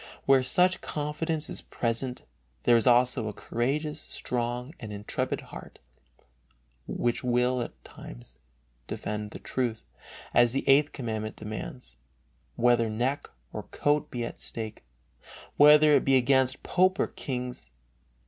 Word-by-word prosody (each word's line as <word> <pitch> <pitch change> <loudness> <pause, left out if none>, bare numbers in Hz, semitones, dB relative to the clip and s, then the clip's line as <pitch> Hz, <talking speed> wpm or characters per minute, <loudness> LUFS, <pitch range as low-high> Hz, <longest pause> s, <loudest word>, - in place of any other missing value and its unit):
Where 135 -1 +6
such 180 +8 +2
confidence 150 +1 -3
is - - -3
present 125 +2 -2 0.4
there 120 - +5
is 115 +2 +3
also 125 -2 +4
a 105 - -4
courageous, 150 +9 -2
strong 125 +2 -3
and 110 -4 -7
intrepid 105 0 -3
heart, - - -11 1.1
which 120 +1 -1
will 125 0 +2
at 120 - -3
all - - -31
times - - -12 0.5
defend 105 0 -4
the - - -8
truth, 120 -4 -2 0.5
as 120 -1 +5
the 135 - -2
Eighth 140 +2 +5
Commandment 110 -5 -4
demands, 110 - -7 0.6
whether 120 -1 +3
neck 125 +6 -1 0.2
or - - -4
coat 145 0 0
be 120 -1 -3
at - - -8
stake, 110 - -5 0.7
whether 150 +1 +8
it - - +3
be 135 -1 +4
against 130 +1 +2
pope 185 +1 +2
or - - +3
kings. 125 - -5
125 Hz, 135 wpm, -28 LUFS, 115-140 Hz, 1.1 s, whether